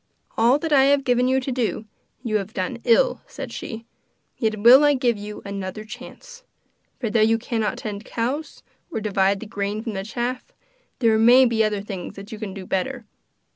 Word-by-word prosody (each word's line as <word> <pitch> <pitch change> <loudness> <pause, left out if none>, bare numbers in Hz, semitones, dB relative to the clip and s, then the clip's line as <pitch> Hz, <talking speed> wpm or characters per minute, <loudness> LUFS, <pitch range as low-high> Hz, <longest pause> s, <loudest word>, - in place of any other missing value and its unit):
'All 235 +4 +4
that 315 +1 -2
I 270 -1 +6
have 280 0 +3
given 250 -1 +2
you 260 +1 +2
to 265 +1 -4
do 240 -3 -2 0.4
you 220 -4 +1
have 205 +2 -6
done - - -3
ill,' - - +3
said - - -8
she, 225 0 -7 0.5
'yet 220 -2 -1
will 250 +6 +8
I 290 -1 +5
give 245 -3 +1
you 210 0 -8
another 200 +1 -5
chance. 485 - -11 0.6
For 230 -5 -2
though 220 0 +3
you 225 +1 +4
cannot 225 -2 -2
tend 210 -1 -6
cows, 265 +7 -4 0.3
or 320 - -3
divide 195 -2 +1
the - - -6
grain 205 +1 -3
from 225 -3 -4
the 195 -1 -4
chaff, 240 +4 -4 0.4
there 225 -3 +3
may 245 +3 +7
be 230 -2 +2
other 210 -2 0
things 195 -3 -7
that 200 +3 -10
you 220 - -7
can 215 -3 -5
do 190 -1 -7
better. 240 +6 -2
225 Hz, 195 wpm, -23 LUFS, 210-255 Hz, 0.6 s, will